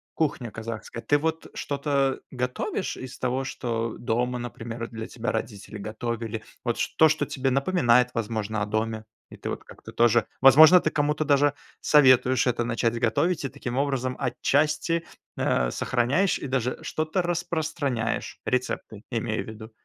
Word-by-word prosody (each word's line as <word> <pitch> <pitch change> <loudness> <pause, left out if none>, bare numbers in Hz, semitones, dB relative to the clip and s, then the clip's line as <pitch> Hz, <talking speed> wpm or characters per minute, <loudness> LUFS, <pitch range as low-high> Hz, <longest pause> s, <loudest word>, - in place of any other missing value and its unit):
кухня 140 -7 -1
казахская. 115 +2 -6
Ты 145 - +3
вот 160 +1 -2
что-то 140 -1 0
готовишь 125 +8 -3
из 130 0 -8
того, 130 +1 -1
что 115 -3 -3
дома, 125 +2 -1
например, 115 -1 -6
для 110 -1 -6
тебя 120 0 -3
родители 105 -2 -5
готовили? 110 +1 -4 0.2
Вот 120 -1 0
ш - - 0
то, 160 - +8
что 155 0 +1
тебе 135 -1 -1
напоминает, 125 -4 +3
возможно, 110 -1 -2
о - - +1
доме? 110 +1 -2 0.2
И - - -12
ты - - -5
вот - - -5
как-то - - -13
тоже, 120 -1 +4 0.2
возможно, 155 +7 +9
ты - - +1
кому-то 150 0 0
даже 145 -1 +3 0.3
советуешь 130 -3 +5
это 120 -1 +1
начать 115 0 0
готовить 145 +8 +1
и - - -2
таким 125 0 -5
образом 135 -2 -1
отчасти, 155 +5 +1 0.3
а, 60 -1 +1
сохраняешь 130 +10 +1
и - - -5
даже 125 -1 -1
что-то 155 +4 -1
распространяешь. 160 -8 -2
Рецепты, 125 -4 -2
имею 115 -2 -2
в - - -17
виду. 110 +1 -9
125 Hz, 155 wpm, -26 LUFS, 115-145 Hz, 0.3 s, возможно